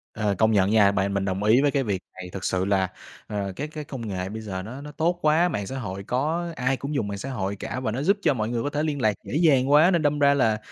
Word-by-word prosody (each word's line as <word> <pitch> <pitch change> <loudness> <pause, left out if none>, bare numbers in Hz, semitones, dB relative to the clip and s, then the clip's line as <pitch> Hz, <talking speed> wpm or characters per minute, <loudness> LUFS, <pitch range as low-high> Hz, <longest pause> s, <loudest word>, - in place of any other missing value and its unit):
Ờ, 105 -2 0
công 110 +2 +3
nhận 100 -2 +3
nha, 105 -2 +5
bạn 100 0 0
mình 100 -1 0
đồng 95 +1 -2
ý 110 +5 +5
với 145 0 +3
cái 135 0 +1
việc 100 -6 -2
này, 90 -1 -9
thực 95 - -6
sự 95 0 0
là, 95 -1 +2 0.4
ờ, 100 -2 -3
cái 145 +7 -4
cái 155 0 -7
công 130 -5 -7
nghệ 95 -2 -3
bây 110 +2 -6
giờ 95 -4 -5
nó 125 +7 -8
nó 150 +1 -8
tốt 170 +4 0
quá, 160 +4 +3
mạng 100 - -3
xã 135 - -5
hội 100 -4 -5
có 160 - -1
ai 130 0 0
cũng 140 +3 -5
dùng 115 -7 0
mạng 100 -1 -4
xã 130 - -6
hội 100 -6 -3
cả 105 - -5
và 125 -4 -2
nó 125 +5 -3
giúp 200 +7 +3
cho 150 - +3
mọi 110 -3 -2
người 120 -1 -2
có 145 - -1
thể 150 +1 -2
liên 150 -3 -2
lạc 110 -2 +3
dễ - - -6
dàng 140 -5 +3
quá, 155 +5 +6
nên 170 -3 +2
đâm 145 -1 +1
ra 140 0 +5
là, 110 -6 +2
120 Hz, 300 wpm, -25 LUFS, 100-145 Hz, 0.4 s, quá